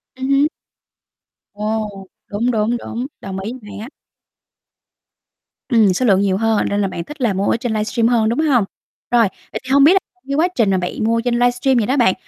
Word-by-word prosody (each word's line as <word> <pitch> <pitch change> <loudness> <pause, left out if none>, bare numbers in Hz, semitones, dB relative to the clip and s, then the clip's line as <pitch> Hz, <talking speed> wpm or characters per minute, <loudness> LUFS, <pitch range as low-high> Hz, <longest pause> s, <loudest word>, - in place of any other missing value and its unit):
Ừm 260 0 -4
hứm. 275 +2 +4 1.1
Ồ! 215 +1 -2 0.4
Đúng, 230 +3 -1
đúng, 225 +1 0
đúng. 240 +1 -5 0.2
Đồng 190 0 -5
ý, 200 +4 -4
hay 205 - -9
á! 220 +4 -7 1.8
Ừm, 220 -6 +4
số 255 - 0
lượng 195 -4 +4
nhiều 195 -2 +1
hơn 225 0 +1
nên 205 0 0
là 200 - +1
bạn 170 -2 -5
thích 295 - -11
là 230 -5 +2
mua 195 +2 -1
ở - - +1
trên 240 0 -3
livestream 220 +2 0
hơn, 230 -2 +2
đúng 235 - -1
hông? 275 -9 +3 0.5
Rồi, 235 -3 +5 0.2
vậy - - -4
thì 255 - -10
hông 280 0 +6
biết 315 +6 +7
á 385 - +4 0.3
cái 275 - -1
quá 320 +4 +3
trình 225 -5 +2
mà 190 - +2
bạn 180 +4 -3
mua 230 +1 +1
trên 245 0 -1
livestream 245 +2 +2
vậy 220 -3 +1
đó 265 - +1
bạn, 235 -7 +4
230 Hz, 215 wpm, -19 LUFS, 205-250 Hz, 1.8 s, biết